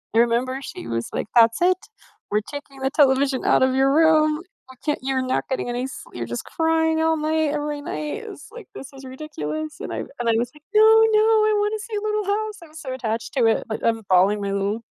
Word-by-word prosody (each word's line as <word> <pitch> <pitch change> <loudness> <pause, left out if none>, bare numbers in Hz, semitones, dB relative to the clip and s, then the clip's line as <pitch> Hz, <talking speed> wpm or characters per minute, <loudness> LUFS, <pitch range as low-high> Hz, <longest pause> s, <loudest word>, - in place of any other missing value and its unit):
I - - +5
remember 245 +3 +1
she 115 - -8
was 115 0 -3
like, - - -3
"That's 230 +4 +5
it. 365 0 +4 0.5
We're 210 - +3
taking 285 -2 -9
the 265 - +1
television 270 -2 +3
out - - +4
of 260 0 +2
your 270 +1 +3
room. 310 0 +4 0.3
You 260 - -17
can't 295 - 0
you're 265 -1 0
not 255 - -1
getting 260 - -2
any 245 +2 -2
slee 255 - -10
you're 115 - -3
just 120 +1 -5
crying 320 0 +1
all 320 0 +2
night, 310 0 0
every 295 0 -3
night." 300 +6 -5
It's 420 +1 -10
like, 470 -3 -11
"This 270 - -8
is 270 0 -12
ridiculous." 310 +3 -6
And, - - -5
I - - -3
wa - - -11
I 230 -1 +2
was 240 +1 -1
like, 300 - -17
"No, 430 - +7
no, 445 0 +6 0.3
I - - +2
want 415 +1 0
to 425 - -8
see 445 - -6
Little 425 -1 -1
House." 425 +1 -1
I - - -13
was 315 - -12
so 260 -2 -5
attached 230 -3 -4
to 245 -3 +3
it, 225 - +2
but 220 - -4
I'm 225 -1 +1
balling 190 +3 +4
my 200 0 -2
little, 200 +3 -1
280 Hz, 235 wpm, -22 LUFS, 240-320 Hz, 0.5 s, No